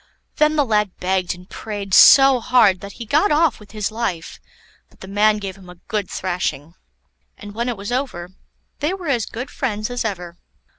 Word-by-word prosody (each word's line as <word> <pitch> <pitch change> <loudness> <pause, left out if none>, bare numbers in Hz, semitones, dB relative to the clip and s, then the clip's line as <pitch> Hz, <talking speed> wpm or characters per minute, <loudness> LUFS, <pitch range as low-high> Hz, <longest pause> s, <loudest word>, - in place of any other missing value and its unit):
Then 305 0 +3
the 290 -2 +2
lad 210 -4 0
begged 185 -1 -1
and 180 +1 -16
prayed 205 -3 -7
so 270 +3 +8
hard 220 -6 +3
that 200 -1 -9
he 235 - -9
got 300 - +2
off 300 -3 +2
with 210 -2 -16
his 215 -1 -3
life, 215 -8 -4 0.5
but - - -26
the 190 - -9
man 210 +2 +2
gave 195 -3 -6
him 185 -2 -15
a 180 - -11
good 205 +2 -4
thrashing. 175 -4 -3 0.6
And 205 -1 -10
when 235 +3 -2
it 240 - -3
was 200 +3 -6
over, 245 -9 -3 0.5
they 320 +6 -1
were 360 -5 -6
as 240 -6 0
good 250 +4 -7
friends 215 -3 -3
as 245 - -2
ever. 180 -5 -5
210 Hz, 195 wpm, -20 LUFS, 190-245 Hz, 0.6 s, so